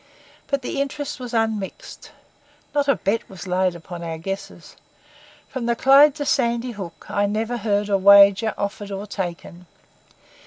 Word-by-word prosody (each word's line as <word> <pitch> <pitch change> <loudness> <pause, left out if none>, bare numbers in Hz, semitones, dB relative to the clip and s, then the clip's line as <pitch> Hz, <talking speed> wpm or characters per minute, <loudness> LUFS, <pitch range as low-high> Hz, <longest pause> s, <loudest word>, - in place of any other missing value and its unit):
But 280 -2 -1
the 275 - -2
interest 285 +1 -4
was 250 -2 -7
unmixed. 220 -4 -3 0.6
Not 285 -1 +1
a 275 - +4
bet 215 +3 -2
was 190 0 -10
laid 185 -1 0
upon 170 +1 -9
our 165 -1 -5
guesses. 195 +1 -7 0.7
From 245 -3 -5
the 235 - +1
Clyde 275 +3 +6
to 290 -2 -4
Sandy 240 -3 0
Hook 190 -6 -9
I 205 0 0
never 220 +4 -2
heard 205 -2 0
a 200 -1 +1
wager 200 +2 +6
offered 200 0 -4
or 200 +1 -5
taken. 180 -2 -6
205 Hz, 155 wpm, -22 LUFS, 195-245 Hz, 0.7 s, Clyde